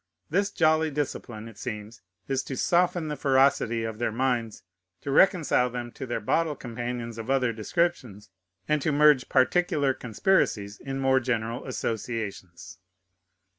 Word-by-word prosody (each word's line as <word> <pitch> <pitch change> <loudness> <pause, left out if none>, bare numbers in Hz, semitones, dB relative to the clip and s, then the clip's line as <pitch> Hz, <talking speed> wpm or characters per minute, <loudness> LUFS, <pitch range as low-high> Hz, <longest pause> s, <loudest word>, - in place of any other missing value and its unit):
This 200 +4 +2
jolly 160 -3 +2
discipline, 130 -6 -4
it 110 -3 -13
seems, 110 -2 -6 0.3
is 135 -1 0
to 135 - -5
soften 175 -2 +2
the 150 - -3
ferocity 130 -5 +2
of 110 -1 -5
their 120 - 0
minds, 120 -2 -1 0.4
to 140 - -4
reconcile 150 -7 +4
them 120 -1 -5
to 130 - -7
their 120 - -2
bottle 155 +8 0
companions 120 -2 -5
of 115 +2 -7
other 130 -3 +2
descriptions, 110 - -2 0.4
and 150 -1 +1
to 155 - 0
merge 150 -2 +4
particular 145 +1 +2
conspiracies 110 - 0
in 135 0 -5
more 135 0 +3
general 120 -1 -2
associations. 105 -8 -5
125 Hz, 140 wpm, -26 LUFS, 115-150 Hz, 0.4 s, reconcile